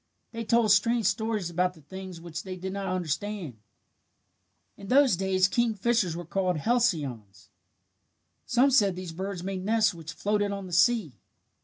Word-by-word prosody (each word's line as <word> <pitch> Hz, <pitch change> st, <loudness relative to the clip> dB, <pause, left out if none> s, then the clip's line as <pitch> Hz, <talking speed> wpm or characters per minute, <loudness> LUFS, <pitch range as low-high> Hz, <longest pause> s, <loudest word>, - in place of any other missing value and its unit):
They 230 Hz, 0 st, -5 dB
told 230 Hz, -1 st, +3 dB
strange 230 Hz, +3 st, +3 dB
stories 220 Hz, -5 st, -1 dB
about 180 Hz, +1 st, 0 dB
the 160 Hz, -, -17 dB
things 185 Hz, +3 st, -9 dB
which 170 Hz, 0 st, -6 dB
they 185 Hz, 0 st, -7 dB
did 190 Hz, +1 st, -5 dB
not 200 Hz, -1 st, -4 dB
understand. 180 Hz, -, -3 dB, 1.2 s
"In 200 Hz, -, -11 dB
those 265 Hz, -2 st, +5 dB
days 185 Hz, 0 st, +2 dB
kingfishers 220 Hz, -3 st, +1 dB
were 175 Hz, 0 st, -6 dB
called 180 Hz, 0 st, -1 dB
halcyons. 140 Hz, -, -1 dB, 1.0 s
Some 255 Hz, +3 st, +3 dB
said 205 Hz, -8 st, +4 dB
these 180 Hz, -2 st, -6 dB
birds 190 Hz, +1 st, -5 dB
made 190 Hz, -1 st, -4 dB
nests 220 Hz, 0 st, +2 dB
which 165 Hz, -1 st, -8 dB
floated 205 Hz, +3 st, 0 dB
on 200 Hz, -1 st, -5 dB
the 180 Hz, -, -9 dB
sea. 185 Hz, -, +2 dB
190 Hz, 155 wpm, -27 LUFS, 175-220 Hz, 1.2 s, those